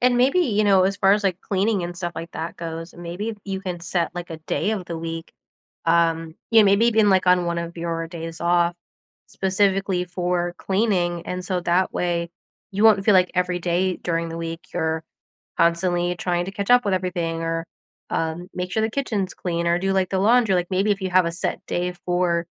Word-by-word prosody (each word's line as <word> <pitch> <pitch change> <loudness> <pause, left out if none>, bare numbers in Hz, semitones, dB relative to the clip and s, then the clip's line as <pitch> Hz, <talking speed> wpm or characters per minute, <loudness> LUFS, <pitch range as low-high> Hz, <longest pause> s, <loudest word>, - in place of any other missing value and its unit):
And 245 0 +3
maybe, 265 +7 +3
you 215 - +2
know, 195 -2 +5
as 195 +1 0
far 195 0 +4
as, 205 0 +1
like, 185 -2 0
cleaning 200 0 0
and 175 0 -5
stuff 175 -1 -4
like 165 +1 -6
that 165 - -5
goes, 165 0 -6
maybe 180 +6 -5
you 195 -1 -4
can 180 -3 -5
set, 170 0 -1
like, 175 -1 -6
a 160 - -6
day 165 +6 -1
of 210 -4 -2
the 170 - -4
week. 165 0 -6 0.5
Um, 165 -1 +2 0.2
yeah, 225 -2 +7
maybe 200 +3 +4
even, 220 -3 +4
like, 190 -1 +3
on 180 -1 +4
one 170 0 -1
of 170 0 -5
your 165 -1 -3
days 165 -1 -7
off, 175 0 +2 0.5
specifically 190 -1 +1
for 175 -1 -2
cleaning. 185 -4 0
And 180 0 -4
so, 185 0 -1
that 175 +2 +1
way, 170 -1 -1 0.4
you 200 +3 0
won't 210 -3 +6
feel 210 - +5
like 185 -1 +4
every 180 -1 0
day 180 +1 0
during 165 -1 -2
the 165 0 -6
week, 165 0 -5
you're 160 -2 -1 0.5
constantly 175 +1 +2
trying 175 0 -1
to 195 - -5
catch 200 +3 -2
up 245 0 +6
with 200 - +1
everything 175 -3 -2
or, 165 0 -2 0.4
um, 165 +3 -2
make 180 0 -4
sure 220 - 0
the 220 - +1
kitchen's 215 -7 -2
clean 170 -1 -2
or 170 +1 +2
do, 195 +1 0
like, 190 -1 +1
the 190 - 0
laundry. 220 -1 +4
Like, 175 0 0
maybe 195 +3 +2
if 200 - 0
you 190 - -1
have 185 -1 +5
a 170 - -1
set 175 - -3
day 180 0 -1
for 175 -1 +1
180 Hz, 215 wpm, -23 LUFS, 170-195 Hz, 0.5 s, yeah